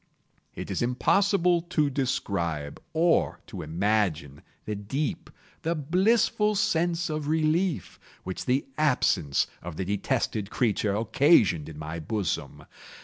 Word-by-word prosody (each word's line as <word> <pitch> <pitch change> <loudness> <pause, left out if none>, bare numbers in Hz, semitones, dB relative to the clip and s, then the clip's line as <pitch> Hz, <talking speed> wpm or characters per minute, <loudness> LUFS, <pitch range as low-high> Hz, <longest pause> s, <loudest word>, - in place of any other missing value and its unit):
It - - -6
is - - -2
impossible 175 +8 +2
to 155 -4 0
describe, 85 - -2
or 165 +1 +2
to 100 -7 -7
imagine, 85 -4 -1 0.2
the 105 - -3
deep, 105 +9 -3 0.3
the 165 +1 -1
blissful 210 - +2
sense 170 -2 +1
of 155 -2 -3
relief 160 - 0 0.2
which 95 - -5
the 130 +2 +1
absence 100 - +2 0.2
of 85 -1 -7
the 95 - -3
detested 105 +1 -1
creature 105 -4 0
occasioned 110 - +3
in 75 - -10
my 80 +2 -5
bosom. 95 +2 -3
125 Hz, 120 wpm, -27 LUFS, -, 0.3 s, occasioned